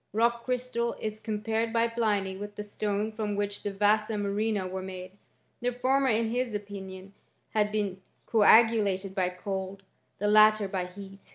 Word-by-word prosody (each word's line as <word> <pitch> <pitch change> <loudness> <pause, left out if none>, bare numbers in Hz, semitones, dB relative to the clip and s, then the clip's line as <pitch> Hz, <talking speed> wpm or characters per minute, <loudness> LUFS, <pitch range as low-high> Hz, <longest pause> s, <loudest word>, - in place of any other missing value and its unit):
Rock 235 +2 +1
crystal 250 -2 -1
is 215 0 -4
compared 220 +1 -2
by 230 0 +2
Pliny 210 -5 0
with 205 +1 -7
the 210 - -5
stonft 210 +1 -2
from 210 -2 -2
which 205 0 -2
the 205 - -3
vasa 210 +2 +2
murrhina 205 -1 -1
were 190 +1 -4
made; 185 -1 -7 0.5
the 245 +1 0
former, 265 +2 +1
in 225 -1 +1
his 245 -2 -1
opinion, 195 -1 -7 0.4
had 210 -1 +1
been 200 -3 -2 0.2
coagulated 210 -3 +4
by 185 -2 +1
cold, 190 +1 -5 0.3
the 205 - -3
lattet 215 -1 +5
by 185 -2 -2
heat. 195 +1 -12
210 Hz, 160 wpm, -28 LUFS, 195-225 Hz, 0.5 s, lattet